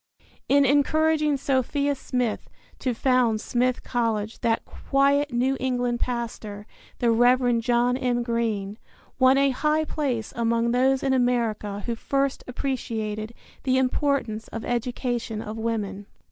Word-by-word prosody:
In 280 0 +5
encouraging 300 +2 +2
Sophia 280 +1 0
Smith 250 -4 -2 0.3
to 255 -3 -1
found 250 -3 +2
Smith 250 +2 0
College 225 -3 -1
that 230 -1 0
quiet 280 +1 +1
New 255 +3 +1
England 245 -2 -1
pastor, 225 -4 -4 0.3
the 235 -1 +2
Reverend 245 0 +3
John 245 +1 +2
M. 250 -2 0
Greene, 225 -3 -2 0.4
won 260 +1 +6
a 275 0 +3
high 305 +4 +1
place 260 -9 -2
among 235 0 +1
those 260 +2 +2
in 270 -1 +2
America 230 -5 0
who 235 - -1
first 275 +3 -1
appreciated 230 -4 -3 0.3
the 260 -1 +1
importance 260 -4 0
of 225 - -6
education 240 -2 -2
of 220 -1 -6
woman. 205 -3 -3
245 Hz, 130 wpm, -25 LUFS, 230-265 Hz, 0.4 s, won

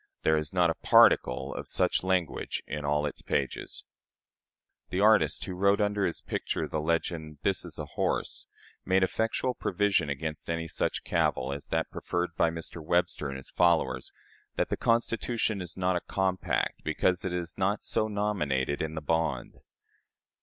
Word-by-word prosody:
There 80 - +4
is 75 -1 -1
not 90 -2 +3
a - - -7
particle 60 - +5
of - - -6
such - - +2
language 95 -5 -1
in 75 -1 -4
all 75 +1 +1
its 75 - -4
pages." - - -2 1.1
The 90 - -1
artist, 110 +2 +4
who 95 - -5
wrote 100 +3 +3
under 105 -1 +1
his 85 - -3
picture - - -2
the 80 - -2
legend 80 -1 -2
"This 95 -2 +1
is - - -6
a - - -4
horse," - - -2 0.4
made 95 0 +3
effectual 115 +6 0
provision 95 -7 +1
against 75 +3 -4
any 85 0 -2
such - - -1
cavil 65 +2 0
as 70 - -6
that - - -1
preferred 90 0 -2
by 85 - +3
Mr. 80 0 -6
Webster 85 -2 +1
and 70 -1 -5
his 65 - -10
followers, 80 -7 +2 0.4
that - - 0
the - - 0
Constitution 115 -2 0
is 90 -1 -7
not 90 0 +1
a 90 - 0
compact, 95 -1 -1
because 90 0 +1
it 95 - -2
is 85 -2 -3
not 100 +2 0
"so 110 - +1
nominated 85 -11 -1
in 80 0 -3
the 80 - -3
bond." 75 -5 -1
85 Hz, 165 wpm, -29 LUFS, 75-95 Hz, 1.1 s, particle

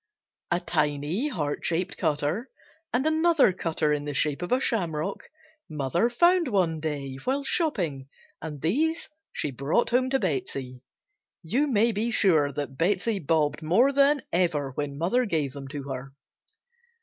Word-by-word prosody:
A 175 - +1
tiny 155 - -1
heart 150 - -3
shaped 175 +2 -1
cutter, 160 - -1 0.4
and 250 +4 0
another 315 - +4
cutter 160 -4 0
in 145 0 -2
the 145 -1 -4
shape 145 +2 0
of 175 - -4
a 250 - +4
shamrock, 185 - -1 0.4
mother 155 - 0
found 345 +6 +3
one 180 -8 +1
day 145 -4 -4
while 275 +2 0
shopping 180 - -1 0.3
and 150 -2 -6
these 315 - 0 0.2
she 150 - -2
brought 140 - 0
home 255 +1 +2
to 270 - +2
Betsey. 135 - -3 0.6
You 250 - +1
may 230 -3 +3
be 220 +2 -1
sure 160 -10 +3
that 140 -1 -5
Betsey 200 +4 +1
"bobbed" 150 -2 +1
more 200 - +4
than 280 -1 +3
ever 160 -6 +1
when 140 +1 -4
mother 195 - +1
gave 155 - -1
them 140 -1 -8
to 140 0 -6
her. 135 0 -6
165 Hz, 150 wpm, -26 LUFS, 145-240 Hz, 0.6 s, another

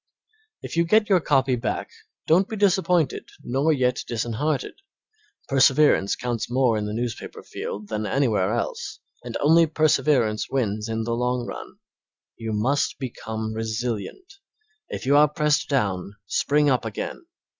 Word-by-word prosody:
If - - -6
you 170 - +5
get 215 +5 +3
your 190 -2 +5
copy 135 -5 +2
back 120 - -3 0.3
don't 180 +5 +3
be 220 - -4
disappointed 185 -6 +1
nor 135 +6 +1
yet 125 -4 +1
disheartened. 120 - -2 0.7
Perseverance 135 -5 +4
counts 120 -2 -3
more 125 -2 +2
in 105 -1 -2
the 105 - -4
newspaper 120 0 -5
field 105 0 -6
than 110 -1 -2
anywhere 110 -6 +1
else, 120 0 -3 0.2
and - - -4
only 165 +3 +5
perseverance 145 -8 +2
wins 110 -4 -1
in 110 0 -2
the 115 +1 -2
long 125 +1 -1
run. - - -8 0.6
You 115 -1 -5
must 125 +7 0
become 110 -4 -5
resilient; 115 - -4 0.5
if - - -5
you 140 +2 +4
are 150 +1 +7
pressed 150 0 0
down, 100 -7 -1
spring 145 +8 +2
up 130 -3 +2
again. 110 - -5
125 Hz, 145 wpm, -24 LUFS, 110-150 Hz, 0.7 s, are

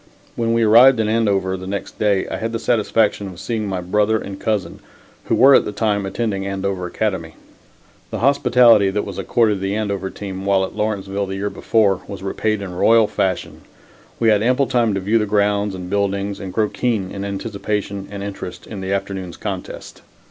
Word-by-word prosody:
When 115 -1 0
we 115 0 +2
arrived 120 +3 +7
in 110 - +1
Andover 100 -4 +1
the 95 0 -8
next 100 0 -5
day 100 -3 +1
I - - -4
had 115 0 -4
the - - 0
satisfaction 110 -3 +1
of 90 -2 -10
seeing 110 -3 -3
my 95 -2 -3
brother 105 +4 +1
and 100 -2 -7
cousin, 105 -6 -2 0.5
who - - +1
were 135 +2 +7
at - - +6
that 105 - -6
time 105 -3 0
attending 100 -1 -2
Andover 95 -2 -3
Academy. 90 -4 -3 0.7
The - - -4
hospitality 120 -5 +5
that 105 +2 -2
was 100 -3 -6
accorded 110 -4 +1
the 95 +1 -1
Andover 100 -3 -2
team, 95 -2 -7
while 95 -1 +2
at - - -10
Lawrenceville 100 -2 -2
the 95 - -4
year 100 +1 -3
before, 100 -4 +1
was 100 -2 -8
repaid 105 +1 -1
in 90 -2 -6
royal 115 +5 +4
fashion. 95 -3 -2 0.6
We 115 - +3
had 105 -1 +4
ample 130 +4 +2
time 120 -5 +1
to - - 0
view 105 +4 +1
the 105 - -1
grounds 100 -1 +1
and 90 -1 -7
buildings 100 0 -1
and 95 -2 -6
grow 110 +2 +1
keen 110 -7 -1
in 100 - -5
anticipation 100 0 -4
and 100 0 -6
interest 90 -3 -7
in 100 -3 -7
the 95 0 -4
afternoon's 95 -2 -3
contest. 95 -4 -7
100 Hz, 195 wpm, -20 LUFS, 95-110 Hz, 0.7 s, arrived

